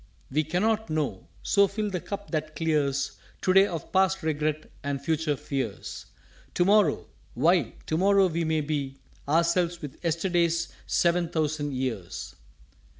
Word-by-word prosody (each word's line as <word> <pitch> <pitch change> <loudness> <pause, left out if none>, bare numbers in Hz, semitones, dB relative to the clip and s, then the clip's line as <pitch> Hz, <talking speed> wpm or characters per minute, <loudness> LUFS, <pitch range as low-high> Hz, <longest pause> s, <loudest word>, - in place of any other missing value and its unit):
"_We 155 +1 +1
cannot 215 +5 +1
know 150 -11 -2 0.2
so 200 -1 +4
fill 210 +1 -3
the 180 -2 -2
cup 200 0 -6
that 155 -1 -2
clears 140 -8 0 0.2
To 185 - +3
day 195 +1 +7
of 165 -6 -6
past 190 -1 +2
regret 155 0 -1 0.2
and 140 -1 -2
future 155 +1 0
fears: 130 -6 -4 0.5
To 175 - +3
morrow! 205 +1 +4 0.3
Why, 170 +8 +3
To 155 - 0
morrow 195 +1 +5
we 170 -2 0
may 160 -1 +1
be 140 -3 -3 0.3
Ourselves 170 +2 +2
with 150 -2 -9
Yesterday's 170 0 +1 0.2
sev'n 170 -1 +2
thousand 150 -3 -1
Years. 115 -9 -4
160 Hz, 145 wpm, -27 LUFS, 145-180 Hz, 0.5 s, day